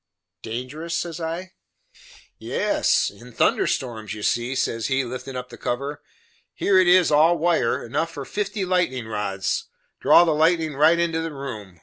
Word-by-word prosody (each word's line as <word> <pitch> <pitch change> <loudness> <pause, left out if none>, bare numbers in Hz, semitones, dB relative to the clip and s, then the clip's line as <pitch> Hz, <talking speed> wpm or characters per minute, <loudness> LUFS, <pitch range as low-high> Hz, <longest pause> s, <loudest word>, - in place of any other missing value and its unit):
"Dangerous?" 140 +9 -5
says 170 -1 -4
I. 170 +3 -4 0.9
"Yes, - - +1
in - - -14
thunder 385 - +2
storms, 110 -5 -3
you 105 - -8
see;" 120 +4 0
says 115 -3 -1
he, 135 0 +1
liftin' 130 +2 -7
up 125 0 -5
the - - -12
cover, 140 +4 -3 0.5
"here 195 -2 +3
it 185 - +4
is 180 -2 +5
all 160 +4 +5
wire, 165 -7 +1
enough 145 +7 -1
for 140 -4 -7
fifty 205 +1 -3
lightnin' 170 -11 0
rods 105 -3 -2 0.3
draw - - +6
the 170 - +2
lightnin' 160 0 +2
right 160 +4 +5
into 165 -1 0
the 165 0 -4
room. 110 -10 -8
150 Hz, 160 wpm, -23 LUFS, 120-170 Hz, 0.9 s, draw